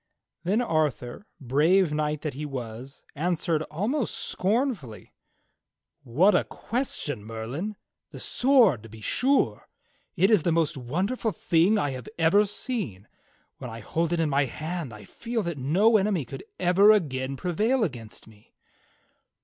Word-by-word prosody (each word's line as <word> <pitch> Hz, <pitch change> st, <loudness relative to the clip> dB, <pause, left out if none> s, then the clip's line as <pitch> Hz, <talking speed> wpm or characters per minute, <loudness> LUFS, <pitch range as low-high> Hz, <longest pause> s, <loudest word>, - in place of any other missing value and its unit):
^ -, -, -54 dB, 0.4 s
" -, -, -49 dB
Then 205 Hz, +7 st, +1 dB
Arthur, 155 Hz, -, -1 dB
brave 150 Hz, +7 st, +3 dB
knight 150 Hz, -1 st, -1 dB
that 150 Hz, -, -3 dB
he 145 Hz, +4 st, -6 dB
was, 130 Hz, -2 st, -7 dB
answered 165 Hz, 0 st, 0 dB
almost 215 Hz, -, -1 dB
scorn 240 Hz, +9 st, 0 dB
fully: 125 Hz, -, -12 dB, 0.9 s
"What 170 Hz, -, +3 dB
a -, -, +3 dB
question. 175 Hz, -, -4 dB
Merlin! 115 Hz, -, -5 dB, 0.3 s
The -, -, -11 dB
sword 245 Hz, -, +3 dB
to 115 Hz, -, -12 dB
be 110 Hz, +1 st, -12 dB
sure. 270 Hz, -, +1 dB, 0.5 s
It 190 Hz, +3 st, +3 dB
is 210 Hz, -6 st, +5 dB
the 170 Hz, -, +1 dB
most 165 Hz, -1 st, +1 dB
wonderful 185 Hz, -, -2 dB
thing 205 Hz, -1 st, +2 dB
I 145 Hz, -8 st, 0 dB
have 130 Hz, +8 st, -7 dB
ever 170 Hz, +6 st, +4 dB
seen. 200 Hz, -, -4 dB, 0.5 s
When 125 Hz, -, -6 dB
I 115 Hz, 0 st, -8 dB
hold 165 Hz, +9 st, -1 dB
it 175 Hz, -, 0 dB
in 160 Hz, -3 st, +1 dB
my 140 Hz, 0 st, +3 dB
hand 155 Hz, +2 st, -5 dB
I 105 Hz, -1 st, -11 dB
feel 230 Hz, -2 st, -4 dB
that 170 Hz, -5 st, -4 dB
no 195 Hz, -, +4 dB
enemy 195 Hz, -7 st, 0 dB
could -, -, -9 dB
ever 190 Hz, +4 st, +6 dB
again 135 Hz, -9 st, 0 dB
prevail 215 Hz, -, +1 dB
against 120 Hz, -, -6 dB
me." 110 Hz, -1 st, -20 dB
165 Hz, 155 wpm, -26 LUFS, 130-210 Hz, 0.9 s, ever